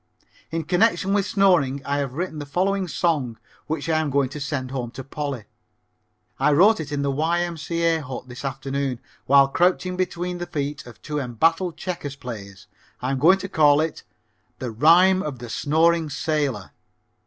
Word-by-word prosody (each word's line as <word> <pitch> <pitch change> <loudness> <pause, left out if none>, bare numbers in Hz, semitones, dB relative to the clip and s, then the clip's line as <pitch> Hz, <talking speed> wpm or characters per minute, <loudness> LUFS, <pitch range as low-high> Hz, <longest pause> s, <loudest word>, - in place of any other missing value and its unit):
In 165 0 -2
connection 195 +3 +2
with 200 -1 +1
snoring 175 -9 +3
I 140 0 -1
have 135 -3 -3
written 170 -2 -3
the 145 - -6
following 190 +5 0
song 145 -8 -1 0.3
which 155 -1 -3
I 160 -1 +2
am 155 -2 -1
going 140 -1 +1
to 150 - -7
send 140 -2 -3
home 125 -3 -3
to 135 - -5
Polly. 140 -3 -5 1.0
I 150 - +3
wrote 200 +8 +5
it 150 -2 -5
in 145 -1 -1
the 140 - 0
Y.M.C.A. 165 +1 0
Hut 130 -2 -7
this 125 +1 -9
afternoon 135 -1 -3 0.3
while 140 0 +6
crouching 180 +4 +1
between 180 -1 -2
the 175 - -4
feet 145 -4 -4
of 115 -6 -13
two 150 -1 -3
embattled 165 - 0
checker 180 -6 -4
players. 100 -6 -8 0.3
I'm 130 +1 -2
going 175 +7 +6
to 195 - -6
call 150 -5 +4
it 160 0 -2 0.6
"The 125 -2 -5
Rhyme 175 +10 +5
of 150 -6 -4
the 120 0 -9
Snoring 160 +5 +2
Sailor." 145 - -2
150 Hz, 170 wpm, -23 LUFS, 135-175 Hz, 1.0 s, while